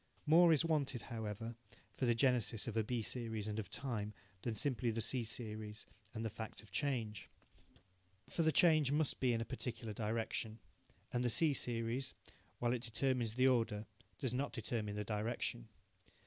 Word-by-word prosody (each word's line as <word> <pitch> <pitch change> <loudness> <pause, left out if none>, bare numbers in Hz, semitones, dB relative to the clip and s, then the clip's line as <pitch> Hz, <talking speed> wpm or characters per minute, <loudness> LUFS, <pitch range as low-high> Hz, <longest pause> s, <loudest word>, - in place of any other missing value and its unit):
More 165 +3 +7
is 160 0 +4
wanted, 140 -7 +1
however, 110 +1 -4 0.4
for 130 - 0
the 120 - +4
genesis 115 -4 +2
of 115 - -3
a 110 - +3
B 115 +1 -1
series 110 -3 -3
and 105 0 -2
of 100 -4 -4
time 105 -4 -3 0.3
than 115 -2 -2
simply 125 +1 +1
the 115 0 -1
C 125 +2 +1
series 110 -2 -4 0.3
and 110 +1 -2
the - - 0
fact 110 +2 -6
of 105 - -18
change. 115 -3 -1 1.0
For - - -1
the 160 -1 +4
change 155 -3 +5
must 150 0 +1
be 130 -2 +3
in 115 -1 +1
a - - -2
particular 120 -3 -4
direction. 110 +1 -1 0.6
And 120 0 +1
the 120 - +2
C 150 +5 +4
series, 120 +1 -1 0.4
while 120 0 +1
it 125 - -1
determines 120 -1 0
the 130 +1 +5
order, 115 -4 +2 0.3
does 130 -5 -1
not 140 +3 -1
determine 110 -3 -2
the 105 - -1
direction. 105 - -2
115 Hz, 175 wpm, -38 LUFS, 110-130 Hz, 1.0 s, More